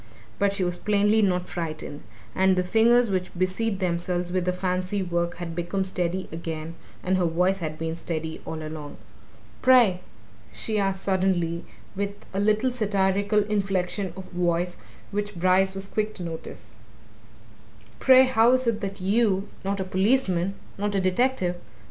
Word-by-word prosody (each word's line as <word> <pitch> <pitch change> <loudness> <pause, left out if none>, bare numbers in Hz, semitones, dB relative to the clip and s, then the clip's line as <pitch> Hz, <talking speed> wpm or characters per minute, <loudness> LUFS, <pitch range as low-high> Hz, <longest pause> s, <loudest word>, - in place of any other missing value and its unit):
But 200 0 +3
she 200 -1 -2
was 175 0 -2
plainly 210 +1 +3
not 180 -3 +1
frightened. 155 -3 -5 0.3
And 190 0 +3
the 180 - +1
fingers 230 +4 +4
which 185 -1 -1
busied 190 +4 0
themselves 175 -1 -1
with 180 -1 0
the 180 - +2
fancy 185 +2 -1
work 170 -1 -1
had 170 -1 -6
become 175 +3 -1
steady 185 0 -2
again, 160 0 -5 0.3
and 185 +1 +1
her 180 - +2
voice 180 +4 +1
had 155 -3 -4
been 160 0 -3
steady 160 -1 -4
all 160 -1 -5
along. 155 -2 -8 0.6
"Pray," 240 -8 +5 0.5
she 215 -2 -2
asked 195 -1 -1
suddenly, 185 -3 +2
and 170 +1 -5 0.3
with 200 +1 -2 0.2
a 195 - -1
little 215 +5 +2
satirical 205 -2 +1
inflection 195 -2 -1
of 190 - -6
voice 175 0 0 0.3
which 205 0 -3
Brice 185 +2 +3
was 195 0 -5
quick 215 +1 -2
to 180 - -6
notice, 165 -1 -7 1.3
"pray, 260 0 +7
how 245 -2 +4
is 255 0 +2
it 230 -2 0
that 195 -1 -5
you 200 0 +2
not 195 +1 -1
a - - 0
policeman, 190 -1 +1 0.2
not 205 0 -1
a - - +3
detective! 185 -1 +1
190 Hz, 160 wpm, -25 LUFS, 175-205 Hz, 1.3 s, pray